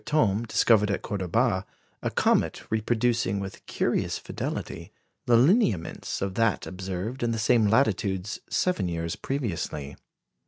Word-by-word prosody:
Thome 115 -7 +1
discovered 105 -2 +4
at 100 - -1
Cordoba 95 -5 0 0.4
a - - -1
comet - - +1
reproducing 110 -2 +1
with 95 -1 -7
curious - - 0
fidelity - - -5 0.4
the 120 -1 +6
lineaments 120 - +2
of 100 -1 -2
that 115 0 +1
observed 95 +6 -5
in 120 - +1
the 115 - -1
same 110 0 +3
latitudes 100 -4 +1
seven 180 - +1
years 85 -1 -3
previously. 85 - -3
105 Hz, 125 wpm, -27 LUFS, 95-120 Hz, 0.4 s, the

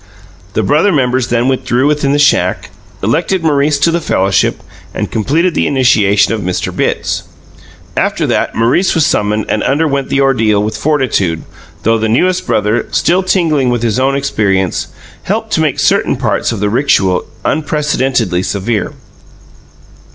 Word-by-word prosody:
The - - +1
brother 155 +8 +2
members 130 -5 +1
then 120 +1 0
withdrew 130 -1 0
within 150 -1 +1
the 145 - +2
shack, 145 0 +1 0.3
elected 165 - 0
Maurice 145 -1 +2
to 165 +4 +2
the 170 +1 -1
fellowship, 95 -8 0 0.3
and - - -3
completed 160 - 0
the - - 0
initiation 110 -6 +3
of 110 - -3
Mr. 90 -2 -3
Bitts. - - -1 0.7
After - - 0
that, - - -1
Maurice 120 +12 +2
was 160 -3 +3
summoned 105 +1 0
and 110 - -1
underwent 140 -1 0
the 140 - 0
ordeal 110 -7 +2
with 110 +1 -3
fortitude, 125 - 0 0.4
though 115 +1 +2
the 110 0 -1
newest 180 +11 +1
brother 105 +3 0
still 180 +2 +1
tingling 165 -8 +1
with 120 -1 -1
his 115 0 0
own 135 +1 +1
experiences 100 -9 -1 0.3
helped - - -3
to - - +1
make - - 0
certain - - +2
parts - - -1
of 115 - -4
the 105 - +1
rixual 105 -8 +1 0.2
unprecedentedly 145 - 0
severe. 105 +3 -2
130 Hz, 150 wpm, -13 LUFS, 105-150 Hz, 0.7 s, initiation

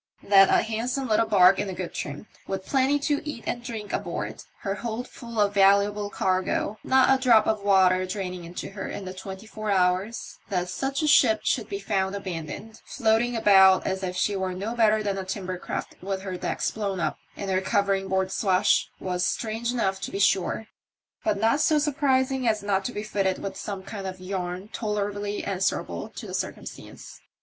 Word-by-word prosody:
That 195 -1 +6
a - - +4
handsome 245 +4 -2
little 220 0 +2
barque 195 -2 +6
in 195 - -2
good 180 -2 -5
trim, 145 +6 -5 0.2
with 190 0 -4
plenty 270 +1 +2
to 290 0 0
eat 295 -6 -6
and 240 - -3
drink 220 -4 -6
aboard, - - -3 0.2
her 195 - -2
hold 230 +3 -4
full 235 -2 -7
of 205 -1 +3
valuable 200 +1 +3
cargo, 190 +2 -1
not 265 0 +5
a 265 - 0
drop 230 -4 +5
of 215 -2 0
water 185 -2 +4
drainiBg 185 -2 -4
into 175 +3 -7
her 195 -1 -5
in 195 - -6
the 185 - -6
twenty 190 +2 -8
four 215 -1 -6
hours 185 +3 0
— - - -32
that 180 -3 -1
such 270 - -2
a - - +2
ship 245 -7 +5
should 225 -4 0
be 200 - -3
found 195 0 -1
abandoned, 195 +3 -6
floating 235 0 +1
about 190 -4 +6
as 190 0 -1
if 180 -1 -3
she 200 +2 +1
were 190 -1 -2
no 205 +5 -3
better 220 -2 +3
than 200 -1 -1
a - - -3
timber 185 -1 -4
craft - - -5
with 190 0 -3
her 190 -2 -4
decks 180 - -2
blown 200 -3 -3
up - - -2 0.2
and 195 -1 -3
her 185 0 +2
covering 195 -1 +1
board 190 0 0
awash, 190 0 +3
was 180 -1 -2
strange 225 +4 -1
enough 195 -6 -1
to - - -3
be - - -4
sure, 200 +2 +2 0.6
but 325 - +1
not 230 +7 +3
so 310 0 +4
surprising 270 -3 +1
as 215 -2 +1
not 195 -1 +1
to 245 - -3
be 210 - -5
fitted 195 -3 0
with 195 - -5
some 200 -2 -5
kind 195 -1 -6
of 185 0 -6
yarn 185 0 -4
tolerably 205 -1 -3
answerable 190 -1 -2
to - - -9
the - - -8
circumstance. - - -7
200 Hz, 195 wpm, -26 LUFS, 190-225 Hz, 0.6 s, That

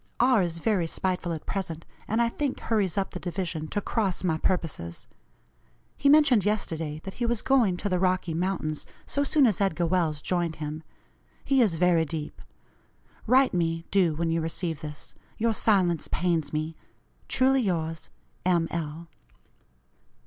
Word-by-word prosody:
R. 245 -3 +5
is 170 -2 -1
very 180 -1 +1
spiteful 180 0 -2
at 160 -2 -5
present, 165 -4 -4 0.2
and 225 +2 +2
I - - +2
think 275 +3 -2
hurries 205 -6 0
up 195 - 0
the - - -6
division 175 -3 -3
to 205 +5 -2
cross 195 -5 -1
my 160 -3 +1
purposes. 150 - -2 0.9
He 280 - +2
mentioned 280 -8 +6
yesterday 165 -7 -1
that 190 - -6
he - - +2
was 235 -2 0
going 235 -9 +3
to 205 - -3
the 180 -2 +1
Rocky 180 -2 +1
Mountains 165 -3 -2 0.2
so 285 - 0
soon 285 0 +4
as 210 -5 +1
Edgar 175 -3 +1
Welles 165 -4 +1
joined 175 -1 -1
him. 155 0 -5 0.6
He 270 -1 +4
is 205 -8 +3
very 170 -1 +3
deep. 155 -1 -6 0.9
Write 260 +3 +5
me, 165 -1 0
do, 180 -5 +3
when 165 +1 -1
you 165 0 +1
receive 165 -1 -3
this. 150 -1 -8 0.2
Your 230 0 +1
silence 185 -7 +2
pains 165 -5 0
me. 155 +1 -2 0.5
"Truly 265 +1 +3
yours, 165 -6 -2 0.3
"M. 175 -2 +2
L." 165 0 -4
175 Hz, 160 wpm, -27 LUFS, 160-210 Hz, 0.9 s, mentioned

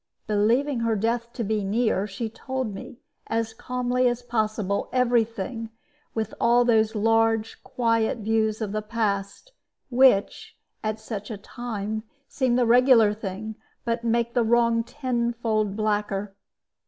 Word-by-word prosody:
Believing 230 +6 +2
her 230 -1 +1
death 230 +3 -1
to 235 - -3
be 215 0 -1
near, 210 -1 +1
she 210 +4 -4
told 260 0 -4
me, 195 +4 -10 0.3
as 225 0 -1
calmly 250 +1 0
as 240 0 -1
possible, 215 -4 -1
every 245 -2 +3
thing, 225 +1 -6 0.5
with 220 -2 -2
all 240 +1 +4
those 220 -2 +3
large, 225 +1 +1
quiet 230 -1 0
views 220 0 0
of 210 -2 -2
the 215 +1 -2
past, 210 - -2 0.4
which 245 -5 +3 0.3
at 215 0 -2
such 220 -1 -6
a 220 - -5
time 215 -1 -5 0.3
seem 255 -3 0
the 250 -1 +3
regular 235 -3 +5
thing, 210 +1 -5 0.3
but 235 0 -1
make 235 0 +1
the 245 - +3
wrong 230 0 +3
tenfold 235 -5 -1
blacker. 210 -2 -1
225 Hz, 140 wpm, -25 LUFS, 215-240 Hz, 0.5 s, regular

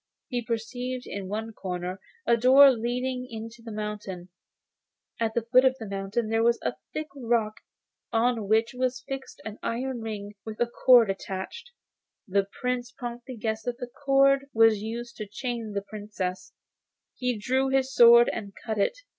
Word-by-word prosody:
He 245 -2 -1
perceived 245 +3 -4
in 195 -2 -5
one 220 +3 -4
corner 180 -1 -5 0.2
a 235 - +5
door 265 +4 +8
leading 250 +2 -2
into 225 +1 -8
the 230 -1 -8
mountain, 210 -4 -5 0.9
and 230 - +2
at 220 - -19
the 235 - +1
foot 250 +3 +5
of 260 -1 +4
the 225 - -7
mountain 195 +3 -2 0.2
was 235 0 +4
a - - 0 0.2
high 310 - -2
rock 230 -4 0 0.5
on 230 -2 +1
which 225 +3 +2
was 255 0 -1
fixed 270 0 -6
an 220 0 -7
iron 245 +1 -3
ring 210 -2 -5
with 220 -1 -8
a 240 - +3
cord 235 -2 +5
attached. 195 - -6 0.6
The 195 0 +1
Prince 250 -1 -2
promptly 245 0 -7
guessed 220 0 -3
that 245 -1 -2
the 245 -1 -7
cord 275 0 +4
was 225 -2 +5
used 235 +2 -6
to 215 - -5
chain 230 0 -4
the 200 -1 -2
Princess, 205 -3 -5 0.7
and 250 -3 0
drew 260 +5 +1
his 265 0 +1
sword 235 0 +8
and 200 -3 -6
cut 220 -3 -2
it. 200 - +1
230 Hz, 165 wpm, -27 LUFS, 215-250 Hz, 0.9 s, door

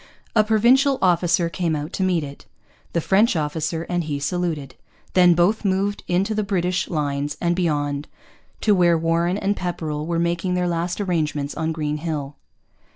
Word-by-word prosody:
A 215 - +6
Provincial 250 +6 +4
officer 175 -1 +2
came 165 0 -1
out 150 +4 -5
to - - -3
meet 180 -4 +1
it. 140 -1 -10 0.5
The 170 - +1
French 200 +6 +3
officer 160 +1 -2
and 175 -1 -2
he 145 -2 -3
saluted. 155 -3 -2 0.4
Then 180 -2 +6
both 180 +7 +2
moved 200 +1 0
into 190 +5 +1
the 215 - 0
British 180 -3 -1
lines 145 -2 -2
and 175 0 +1
beyond, 145 -4 -1 0.5
to 210 - +4
where 175 -3 +4
Warren 165 +3 +1
and 200 0 0
Pepperrell 160 -4 -3
were 170 -1 -1
making 170 +2 0
their 180 0 0
last 175 +2 -2
arrangements 155 -7 -1
on 160 0 -2
Green 150 -1 -2
Hill. 150 -3 -4
170 Hz, 165 wpm, -22 LUFS, 155-185 Hz, 0.5 s, A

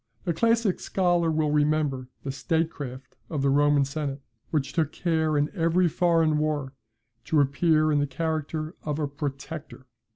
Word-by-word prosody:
The 170 - 0
classic 230 0 +2
scholar 175 -3 +1
will 155 -1 +1
remember 150 -3 +1 0.2
the 135 - -3
state 160 +4 0
craft 130 -2 -8
of 150 -4 -2
the 140 - +3
Roman 145 0 +4
Senate, 140 0 -4 0.3
which 150 -4 -1
took 160 -3 +1
care 160 -3 0
in 145 +1 +1
every 175 0 +2
foreign 165 -2 +2
war 150 -3 -1 0.5
to 155 - +2
appear 155 +2 +3
in 145 - +3
the 145 - +1
character 155 +1 -3
of 150 -1 -3
a 150 -2 -1
PROTECTOR. 140 0 -6
155 Hz, 160 wpm, -26 LUFS, 145-165 Hz, 0.5 s, Roman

